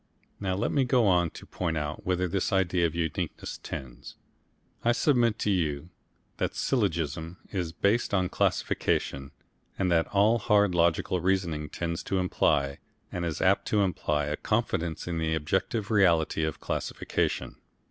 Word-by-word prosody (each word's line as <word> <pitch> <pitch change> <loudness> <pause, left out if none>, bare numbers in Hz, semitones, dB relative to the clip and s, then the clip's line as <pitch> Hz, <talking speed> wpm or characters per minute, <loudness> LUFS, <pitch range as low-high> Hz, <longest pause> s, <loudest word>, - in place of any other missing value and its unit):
Now 95 -2 -1
let 100 - -1
me 140 - +3
go 125 -2 +3
on 90 -3 +3
to - - -12
point 85 -3 -2
out 75 0 -4
whither 90 0 +1
this 95 +4 -1
idea 90 -3 +2
of 80 - -7
uniqueness 80 -3 -3
tends. 65 -3 -8 0.7
I 120 - +4
submit 120 -5 +2
to 105 - 0
you 80 -3 -1 0.5
that - - -2
syllogism 85 - -1
is 90 -5 -2
based 100 +7 +1
on 95 -2 +2
classification, 70 -5 0 0.5
that 85 -4 +2
all 105 +4 +3
hard 105 -3 +3
logical 85 +1 +2
reasoning 85 -5 0
tends 85 -1 -3
to 95 - 0
imply 75 -6 +1 0.3
and 90 - -3
is 80 -3 -2
apt - - +3
to 105 - +2
imply 75 -5 0
a 75 +1 -2
confidence 80 0 -1
in 85 -2 -2
the 80 0 0
objective 95 +7 -1
reality 85 -6 +3
of 80 - -4
classification. - - -2
90 Hz, 150 wpm, -28 LUFS, 80-100 Hz, 0.7 s, I